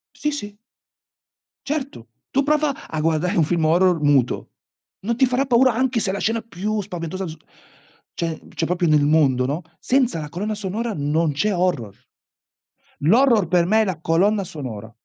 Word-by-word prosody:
Sì, 300 - -1
sì. 205 -8 -6 1.1
Certo, 275 - -4 0.2
tu 275 +1 +2
prova 300 -1 0
a 155 -1 -3
guardare 165 +4 0
un 165 - +4
film 165 0 0
horror 175 +1 +3
muto; 140 -4 +1 0.5
non 230 +4 -2
ti 265 - +5
farà 255 +2 0
paura 255 -1 +4
anche 255 0 0
se 190 -3 -1
la 200 - -3
scena 225 +1 0
più 215 0 -3
spaventosa 185 0 -5
z 160 - -7 0.8
cioè- 165 -2 -3 0.2
cioè, 165 - -1
proprio 175 0 0
nel 150 -2 +4
mondo, 140 -5 +3
no, 145 +6 -2 0.2
senza 250 - +1
la 150 - -7
colonna 210 +6 -3
sonora 210 +3 -3
non 150 +2 0
c'è 200 +9 0
horror. 160 - -1 1.1
L'horror 225 - +4
per 170 0 +3
me 220 +2 +4
è - - +2
la 180 -5 -3
colonna 195 +6 +2
sonora. 120 - -7
180 Hz, 170 wpm, -22 LUFS, 155-230 Hz, 1.1 s, ti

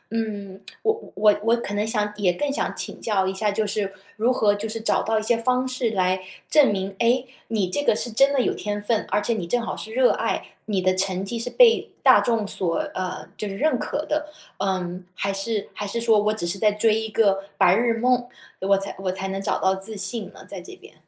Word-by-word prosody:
嗯， 200 -4 -4 0.2
我 440 0 +3
我 450 - -12
我 210 +1 +4
我 230 +1 +4
可 205 -3 -5
能 205 - 0
也 215 - -1
想 210 -2 -1
也 185 -4 +2
更 285 +9 -2
想 280 - -2
请 - - -6
教 200 -4 +1
一 190 - -1
下， 210 +2 0
就 215 +1 0
是 200 -1 -2 0.2
如 230 +4 +2
何 210 -4 +3
就 210 +2 -4
是 225 +1 -4
找 220 - +1
到 220 0 0
一 - - -5
些 235 +1 +2
方 255 +2 +1
式 255 -2 -1
来 185 -2 +1 0.3
证 295 -7 +6
明， 195 0 -3
诶， 245 +2 +2 0.2
你 210 -5 0
这 290 - 0
个 220 - +3
是 240 +1 -3
真 275 +5 +4
的 280 - +1
有 - - 0
天 205 0 -3
分， 225 0 0
而 - - +2
且 230 +3 0
你 180 -6 -4
正 245 - +1
好 230 - -4
是 220 - -7
热 255 +1 +4
爱， - - -1 0.2
你 195 -4 -1
的 185 0 +3
成 190 0 0
绩 230 +4 -4
是 240 +2 -4
被 470 - +5
大 - - +7
众 225 -4 0
所 175 -4 +3 0.2
呃， 185 0 -4
就 210 - -4
是 195 - -6
认 285 -3 +1
可 300 - -3
的？ 305 0 -1 0.3
呃， 185 -2 -2 0.2
还 200 +1 -1
是 205 +1 -2
还 205 - -5
是 235 +4 -2
说 225 -2 +4
我 210 +1 +2
只 195 -5 -4
是 180 +3 -2
在 210 -1 +4
追 215 +1 +2
一 220 0 -4
个 195 -2 +2
白 180 +1 +5
日 230 +1 +1
梦， 245 +1 +2 0.3
我 195 +1 +3
才 195 +1 -2
我 185 -1 -1
才 190 +1 -4
能 195 0 -3
找 - - 0
到 190 0 +2
自 195 +2 -4
信 220 +1 -3
呢？ - - -14
在 190 -3 -7
这 - - -11
边。 - - -16
210 Hz, 265 characters per minute, -24 LUFS, 195-235 Hz, 0.3 s, 大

